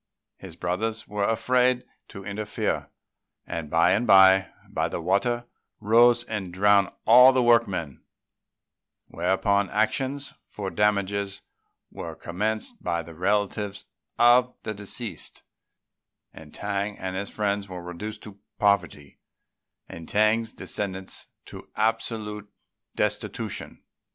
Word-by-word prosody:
His - - -11
brothers 110 +6 -2
were 105 0 -1
afraid 125 +2 +2 0.2
to 100 -2 -10
interfere; 105 +1 -3 0.6
and 80 -3 -5
by 85 +3 +4
and 110 +6 +1
by 95 -1 +7 0.4
the - - -4
water 100 +8 0 0.3
rose 120 +2 +5
and 100 -6 -5
drowned 100 +1 +4 0.2
all 125 +3 +9
the 130 -1 +2
workmen; 100 - +2 1.1
whereupon 95 +3 +1
actions 135 +6 -1
for 100 -2 -7
damages 100 -1 0 0.5
were - - -7
commenced 105 +5 -3
by 85 -1 -1
the 85 - -11
relatives 100 +3 -1 0.3
of 125 +1 +5
the 110 - -3
deceased, 105 -1 -6 0.9
and 75 -2 -13
T'ang 100 +2 -3
and 95 0 -5
his 100 +2 -3
friend 100 -1 -1
were 90 -2 -8
reduced 105 +5 -7
to 100 -2 -11 0.2
poverty, 85 -9 0 0.7
and 80 -1 -10
T'ang's 110 +2 +2
descendants 95 -2 -6 0.2
to - - -11
absolute 110 -2 -2 0.4
destitution. - - -3
100 Hz, 110 wpm, -26 LUFS, 95-110 Hz, 1.1 s, all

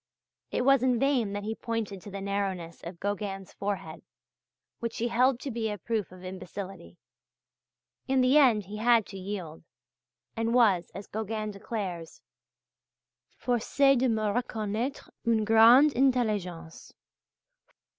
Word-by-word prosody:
It 245 - -1
was 275 -2 +5
in 250 -1 +2
vain 250 -5 +1
that 205 0 -4
he 220 +2 -2
pointed 220 -4 -4
to 205 - -10
the 195 0 -6
narrowness 195 -4 -3
of 170 0 -8
Gauguin's 200 -1 -4
forehead, 195 -6 -4 0.8
which 230 -1 -4
he 235 +1 -1
held 250 +2 +3
to 275 - -4
be 225 -1 -2
a 210 - -4
proof 215 -1 -3
of 185 0 -13
imbecility; 185 -1 -8 1.1
in 265 0 +3
the 255 +2 +4
end 245 -8 +5
he 205 +3 -7
had 230 -1 +4
to 195 - -9
yield, 185 -5 -6 0.7
and 230 +1 0
was, 200 -8 +4
as 195 +1 -7
Gauguin 215 0 -4
declares: 195 -5 -5 1.2
"forcé 275 +3 +2
de 255 0 +2
me 220 -1 0
reconnaitre 225 +3 -2 0.2
une 225 -2 +2
grande 235 +7 +7
intelligence." 210 -11 -1
215 Hz, 135 wpm, -28 LUFS, 195-240 Hz, 1.2 s, grande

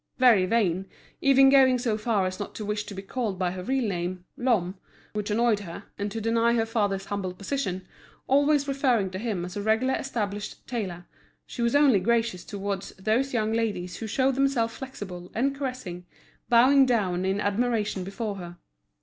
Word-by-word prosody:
Very 230 -8 +5
vain, 195 -4 +1 0.3
even 270 0 +6
going 265 -2 +6
so 235 -3 0
far 215 -3 0
as 185 0 -4
not 205 - -6
to 215 - -5
wish 210 0 -2
to 200 - -8
be 195 - -6
called 210 -2 -3
by 180 -1 0
her 185 0 -6
real 260 +4 0
name, 180 -1 -3
Lhomme, 215 -8 +1 0.4
which 210 0 -3
annoyed 225 0 +2
her, 170 -4 -8
and 205 0 -3
to 225 - -3
deny 230 +1 +2
her 225 -1 +2
father's 205 -4 -1
humble 190 -3 -4
position, 195 -3 -3 0.4
always 285 +1 +3
referring 255 -8 +1
to 185 - -5
him 205 -6 -2
as 180 - -8
a 205 - -3
regularly 220 +5 +1
established 210 -5 -4
tailor, 190 -8 -4 0.4
she 240 - -6
was 235 +3 +1
only 280 -8 +5
gracious 225 -4 0
towards 200 -1 -4
those 220 +8 0
young 220 -2 0
ladies 205 -6 -2
who 225 - -5
showed 265 +4 +2
themselves 260 -4 +1
flexible 190 -9 -8
and 270 +5 +1
caressing, 255 -11 -5 0.4
bowing 260 +3 +6
down 190 -7 +1
in 190 +1 0
admiration 210 -1 0
before 200 +2 -4
her. 175 -1 -8
215 Hz, 180 wpm, -26 LUFS, 190-245 Hz, 0.4 s, even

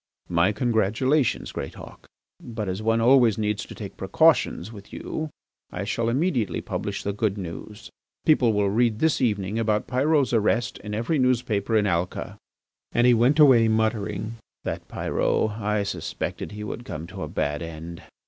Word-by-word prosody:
"My 90 +3 +3
congratulations, 120 +5 +1
Greatauk. - - -8 0.4
But 110 -3 -5
as 95 +2 -3
one 115 +1 +2
always 120 -3 +5
needs 105 -1 -1
to - - -10
take - - -8
precautions 95 +6 +2
with 100 -3 -12
you 155 0 -4 0.4
I - - -4
shall 115 0 -1
immediately 130 - 0
publish 100 -1 -4
the 100 - -2
good 105 -1 -1
news. 95 +4 -8 0.3
People 130 -7 +4
will 100 -2 +1
read 115 0 +2
this 160 +3 +1
evening 105 -3 0
about 110 -2 +1
Pyrot's 140 +1 +2
arrest 115 +2 +1
in 105 0 -5
every 120 +8 0
newspaper 115 -4 +1
in 105 - +2
Alca... 90 -2 -2 0.3
." - - -64
And 120 - +3
he 125 - +6
went 120 +5 +3
away 130 -7 +7
muttering: 110 0 -1 0.3
"That - - -4
Pyrot! 110 - 0
I 105 0 0
suspected 100 - -4
he 105 0 -6
would 110 +3 -5
come 80 - -6
to - - -9
a - - -3
bad 75 +1 -2
end." 85 0 -7
110 Hz, 165 wpm, -25 LUFS, 100-120 Hz, 0.4 s, away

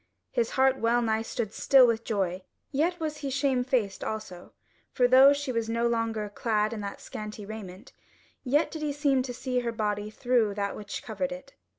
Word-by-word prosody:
His 235 -3 0
heart 265 0 +4
well 235 +1 +2
nigh 220 -1 +1
stood 225 -1 -4
still 265 -2 +6
with 230 -1 +1
joy, 190 -5 -1 0.3
yet 335 +5 0
was 310 -2 -3
he 280 - -4
shamefaced 255 -6 0
also: 200 -5 -6 0.4
for 250 - +3
though 260 +2 +8
now 285 - +7
she 285 -2 -3
was 230 -2 -2
no 230 +1 0
longer 225 -2 -1
clad 215 +1 0
in 215 - -5
that 200 -1 -6
scanty 210 -1 -7
raiment, 200 -3 -9 0.5
yet 285 +5 +2
did 315 - -6
he 300 -1 -1
seem 280 -2 +2
to 255 0 -4
see 250 +1 -2
her 240 -1 -2
body 210 -2 -2
through 230 -2 +1
that 200 -1 -2
which 205 -1 -6
covered 270 +4 -3
it. 270 0 -9
235 Hz, 195 wpm, -28 LUFS, 215-265 Hz, 0.5 s, though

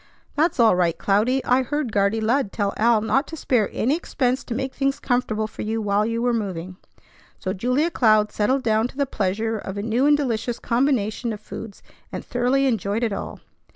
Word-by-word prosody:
"That's 310 -1 +1
all 225 -5 +6
right, 170 -2 +1
Cloudy. 225 +7 +1
I 250 +1 +3
heard 270 -1 -2
Guardy 200 +2 +1
Lud 225 0 +1
tell 200 -2 -1
Al 225 0 +3
not 265 +6 +1
to 320 - -8
spare 240 -7 +1
any 265 +6 +1
expense 260 -6 -1
to 235 - -4
make 265 +1 -3
things 275 0 -1
comfortable 245 -4 0
for 215 - -8
you 220 +1 -2
while 210 0 +1
you 230 +1 -2
were 245 -1 +2
moving." 185 -5 -4 0.6
So 185 - -3
Julia 250 - 0
Cloud 215 -6 +3
settled 255 +6 0
down 220 +1 +2
to 265 - -16
the 280 - +2
pleasure 220 -1 -2
of 195 0 -6
a 200 - -3
new 235 +5 +1
and 295 0 +5
delicious 240 -4 -2
combination 235 -2 0
of 210 - -7
foods, 215 -1 -9 0.3
and - - -6
thoroughly 250 +3 +1
enjoyed 220 -2 0
it 225 -3 0
all. - - -6
230 Hz, 200 wpm, -23 LUFS, 210-260 Hz, 0.6 s, all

